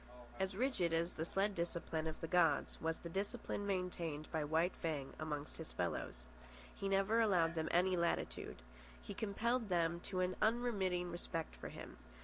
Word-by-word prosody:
As 190 Hz, 0 st, 0 dB
rigid 220 Hz, -9 st, +2 dB
as 165 Hz, +2 st, +1 dB
the 160 Hz, -, -2 dB
sled 195 Hz, +4 st, +1 dB
discipline 170 Hz, -2 st, -1 dB
of 160 Hz, -, -4 dB
the 165 Hz, -, -2 dB
gods, 175 Hz, -1 st, +3 dB
was 165 Hz, 0 st, 0 dB
the -, -, -7 dB
discipline 200 Hz, +2 st, -2 dB
maintained 175 Hz, -5 st, -1 dB
by 160 Hz, -1 st, +1 dB
White 160 Hz, +4 st, +2 dB
Fang 150 Hz, -5 st, -2 dB
amongst 150 Hz, -1 st, -3 dB
his 160 Hz, -, -7 dB
fellows. 85 Hz, -8 st, -2 dB, 0.5 s
He 195 Hz, -, -2 dB
never 195 Hz, +4 st, +3 dB
allowed 175 Hz, -7 st, +4 dB
them 160 Hz, -1 st, -1 dB
any 180 Hz, +2 st, +4 dB
latitude. 170 Hz, -, -1 dB, 0.4 s
He 60 Hz, -, -7 dB
compelled 225 Hz, +2 st, 0 dB
them 170 Hz, -1 st, +2 dB
to 185 Hz, -1 st, 0 dB
an 180 Hz, 0 st, 0 dB
unremitting 205 Hz, -6 st, +2 dB
respect 165 Hz, -1 st, -3 dB
for -, -, -6 dB
him. -, -, -9 dB
175 Hz, 165 wpm, -39 LUFS, 160-195 Hz, 0.5 s, allowed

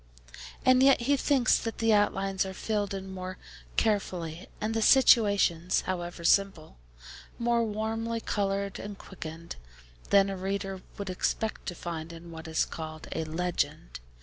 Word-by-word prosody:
And 255 Hz, 0 st, +6 dB
yet 270 Hz, -2 st, +6 dB
he 280 Hz, +4 st, +3 dB
thinks 275 Hz, -2 st, +3 dB
that 225 Hz, -, -4 dB
the 225 Hz, -1 st, +3 dB
outlines 195 Hz, -2 st, +2 dB
are 190 Hz, 0 st, -6 dB
filled 205 Hz, -1 st, -2 dB
in 190 Hz, 0 st, -6 dB
more 185 Hz, 0 st, -6 dB, 0.4 s
carefully, 180 Hz, -5 st, -1 dB
and 215 Hz, +1 st, -1 dB
the 225 Hz, -, 0 dB
situations 200 Hz, -9 st, +5 dB
(however 175 Hz, -2 st, -4 dB
simple) 170 Hz, -, +1 dB, 0.6 s
more 235 Hz, 0 st, +2 dB
warmly 225 Hz, +1 st, -2 dB
coloured 200 Hz, -2 st, -2 dB
and 205 Hz, 0 st, -7 dB
quickened, 165 Hz, -3 st, -8 dB, 0.5 s
than 195 Hz, 0 st, +5 dB
a -, -, -3 dB
reader 195 Hz, 0 st, -3 dB, 0.2 s
would 200 Hz, -2 st, -4 dB
expect 220 Hz, +4 st, -2 dB
to 175 Hz, -, -3 dB
find 165 Hz, -1 st, -5 dB
in 170 Hz, 0 st, -10 dB
what 160 Hz, 0 st, -8 dB
is 160 Hz, 0 st, +1 dB
called 155 Hz, -1 st, -7 dB
a 160 Hz, -, -2 dB
'legend.' 160 Hz, -, -2 dB
195 Hz, 150 wpm, -29 LUFS, 175-220 Hz, 0.6 s, And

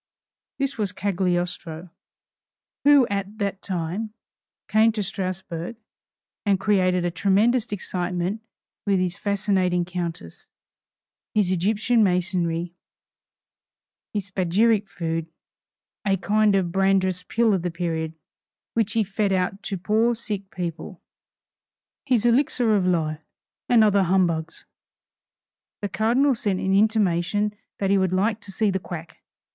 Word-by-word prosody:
This 275 Hz, -3 st, -2 dB
was 205 Hz, -3 st, +1 dB
Cagliostro, 180 Hz, -3 st, -2 dB, 0.9 s
who 285 Hz, -3 st, +6 dB
at 200 Hz, +1 st, -3 dB
that 200 Hz, -2 st, -2 dB
time 190 Hz, +4 st, -3 dB, 0.5 s
came 220 Hz, +1 st, +4 dB
to 210 Hz, -2 st, -2 dB
Strasburg 185 Hz, +1 st, -4 dB, 0.7 s
and 200 Hz, -3 st, +2 dB
created 185 Hz, -3 st, +2 dB
a 175 Hz, -, 0 dB
tremendous 210 Hz, +7 st, +2 dB
excitement 180 Hz, +1 st, -2 dB, 0.5 s
with 195 Hz, -2 st, +3 dB
his 180 Hz, -1 st, -1 dB
fascinating 190 Hz, -3 st, 0 dB
Countess, 170 Hz, -, -6 dB, 0.9 s
his 200 Hz, -4 st, +3 dB
Egyptian 215 Hz, +5 st, +2 dB
masonry, 175 Hz, -2 st, 0 dB, 1.4 s
his 200 Hz, -2 st, -4 dB
Spagiric 200 Hz, +3 st, +2 dB
Food 165 Hz, -1 st, -3 dB, 0.8 s
(a 195 Hz, -2 st, +2 dB
kind 210 Hz, +2 st, +2 dB
of 185 Hz, -3 st, +1 dB
Brandreth's 190 Hz, -1 st, +2 dB
pill 225 Hz, +4 st, +1 dB
of 190 Hz, -, +1 dB
the 175 Hz, -, -2 dB
period,) 165 Hz, -2 st, -3 dB, 0.6 s
which 220 Hz, -3 st, 0 dB
he 225 Hz, -, +2 dB
fed 200 Hz, 0 st, -1 dB
out 190 Hz, +1 st, 0 dB
to 195 Hz, -, -4 dB
poor 220 Hz, +6 st, +2 dB
sick 205 Hz, -4 st, -5 dB
people, 175 Hz, -5 st, -6 dB, 1.1 s
his 245 Hz, -4 st, +2 dB
elixir 240 Hz, -2 st, +3 dB
of 190 Hz, -3 st, +1 dB
life, 155 Hz, -3 st, 0 dB, 0.5 s
and 235 Hz, -3 st, +6 dB
other 200 Hz, -2 st, +4 dB
humbugs. 170 Hz, -3 st, 0 dB, 1.2 s
The 205 Hz, -, -1 dB
Cardinal 245 Hz, +8 st, +2 dB
sent 205 Hz, -5 st, -1 dB
an 190 Hz, -, 0 dB
intimation 205 Hz, -1 st, +2 dB, 0.2 s
that 195 Hz, -1 st, 0 dB
he 200 Hz, -, +4 dB
would 190 Hz, -1 st, +1 dB
like 210 Hz, +4 st, +1 dB
to 200 Hz, -, -11 dB
see 205 Hz, +1 st, +1 dB
the 190 Hz, -, -1 dB
quack. 170 Hz, -2 st, -8 dB
195 Hz, 125 wpm, -24 LUFS, 180-215 Hz, 1.4 s, who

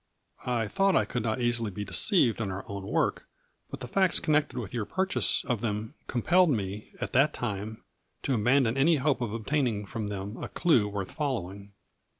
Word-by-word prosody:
I 120 Hz, -3 st, 0 dB
thought 195 Hz, -, +2 dB
I -, -, +3 dB
could 125 Hz, -, -3 dB
not 110 Hz, +3 st, -1 dB
easily 120 Hz, -2 st, +1 dB
be 105 Hz, +1 st, -5 dB
deceived 130 Hz, -, +2 dB
in 105 Hz, -, -2 dB
our 95 Hz, +1 st, -5 dB
own 100 Hz, -1 st, -6 dB
work, -, -, 0 dB, 0.4 s
but 140 Hz, -1 st, -8 dB
the 125 Hz, -, -5 dB
facts 190 Hz, +6 st, +3 dB
con 155 Hz, -3 st, 0 dB
nected 150 Hz, -3 st, +1 dB
with 110 Hz, -4 st, -6 dB
your 115 Hz, -3 st, -1 dB
purchase 190 Hz, -, +1 dB
of 120 Hz, -5 st, -1 dB
them 110 Hz, +2 st, -3 dB
compelled 175 Hz, +8 st, +3 dB
me, 105 Hz, -5 st, -2 dB
at -, -, -4 dB
that 135 Hz, +4 st, +4 dB
time, 110 Hz, -1 st, -4 dB, 0.4 s
to 135 Hz, -, 0 dB
abandon 125 Hz, +2 st, +3 dB
any 160 Hz, +5 st, +5 dB
hope 140 Hz, -1 st, +1 dB
of 120 Hz, -4 st, -2 dB
ob 110 Hz, 0 st, -5 dB
taining 120 Hz, -9 st, 0 dB
from 110 Hz, 0 st, -4 dB
them 100 Hz, +2 st, -5 dB
a -, -, -5 dB
clue 125 Hz, -12 st, +3 dB
worth 100 Hz, -2 st, -4 dB
following. 100 Hz, -, -4 dB
115 Hz, 195 wpm, -28 LUFS, 105-140 Hz, 0.4 s, any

